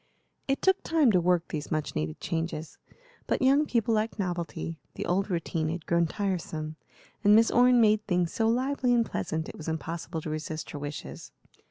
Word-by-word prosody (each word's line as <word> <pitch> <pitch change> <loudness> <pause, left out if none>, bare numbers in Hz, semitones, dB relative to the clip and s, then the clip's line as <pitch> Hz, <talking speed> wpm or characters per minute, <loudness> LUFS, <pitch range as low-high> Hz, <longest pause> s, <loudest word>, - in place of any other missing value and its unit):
It 275 0 0
took 380 0 +4
time 310 -7 +3
to 180 -3 +3
work 175 -1 +2
these 150 -1 -4
much 155 -2 -2
needed 75 0 -3
changes, 165 -1 -4 0.5
but - - +1
young 280 +3 +4
people 230 -1 +1
like 220 +1 0
novelty; 175 -3 -3 0.2
the - - -4
old 195 +4 0
routine 165 -3 -1
had 165 0 -4
grown 170 -1 +2
tiresome, 165 -5 -3 0.5
and 205 +1 +7
Miss 225 +1 +5
Orne 245 0 +5
made 215 -1 +3
things 180 -3 +1
so 225 - +1
lively 250 +1 +1
and 230 -1 +3
pleasant 160 -6 -3
it - - -9
was 155 - -8
impossible 165 +1 -4
to 155 - -5
resist 155 +1 -5
her 145 - -6
wishes. 145 +1 -7
180 Hz, 185 wpm, -28 LUFS, 160-225 Hz, 0.5 s, and